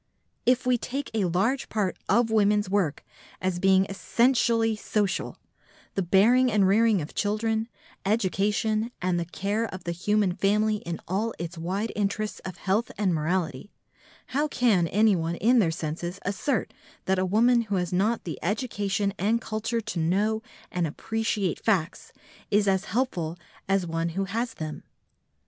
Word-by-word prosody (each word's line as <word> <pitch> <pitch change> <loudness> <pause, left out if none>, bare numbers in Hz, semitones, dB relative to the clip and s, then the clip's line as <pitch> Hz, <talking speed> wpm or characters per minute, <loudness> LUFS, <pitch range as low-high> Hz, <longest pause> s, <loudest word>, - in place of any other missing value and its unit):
If 250 0 +3
we 250 -1 +3
take 275 +5 -4
a 215 -4 +1
large 195 +10 0
part 205 -4 -1
of 230 +2 +3
women's 210 -1 +3
work 185 -6 0 0.3
as 185 -1 -1
being 190 0 +4
essentially 230 +2 +2
social, 210 -2 -1 0.6
the 195 - 0
bearing 230 +8 +4
and 205 -3 +4
rearing 210 -2 +3
of 145 - -9
children, 220 +2 0 0.4
education 210 +2 +1
and 180 -1 0
the 170 - -2
care 200 +6 -2
of 185 -1 -8
the 170 - -2
human 200 +3 +1
family 210 +3 +2
in 170 -4 -5
all 210 +6 -1
its 170 +1 -5
wide 190 +7 -2
interests 210 +1 -1
of 185 -1 -8
health 205 +4 0
and 195 -4 +1
morality, 165 0 -1 0.6
how 295 +3 +2
can 220 - +2
anyone 180 -5 +2
in 240 +7 +4
their 185 -7 +3
senses 165 +3 -4
assert 205 +5 -1 0.3
that 190 0 +1
a - - +2
woman 230 +6 +4
who 200 - +1
has 180 -1 -1
not 215 +6 +1
the 165 - -5
education 205 -1 -1
and 215 +5 +2
culture 225 +1 -2
to 215 -5 -4
know 205 +7 +1 0.3
and 175 -2 0
appreciate 210 +2 -2
facts 185 -7 0 0.4
is 205 0 +3
as 190 0 +2
helpful 185 -8 -1 0.3
as 195 -2 +2
one 165 0 -1
who 195 - +1
has 225 +4 -3
them? 155 -1 -5
200 Hz, 155 wpm, -26 LUFS, 180-220 Hz, 0.6 s, being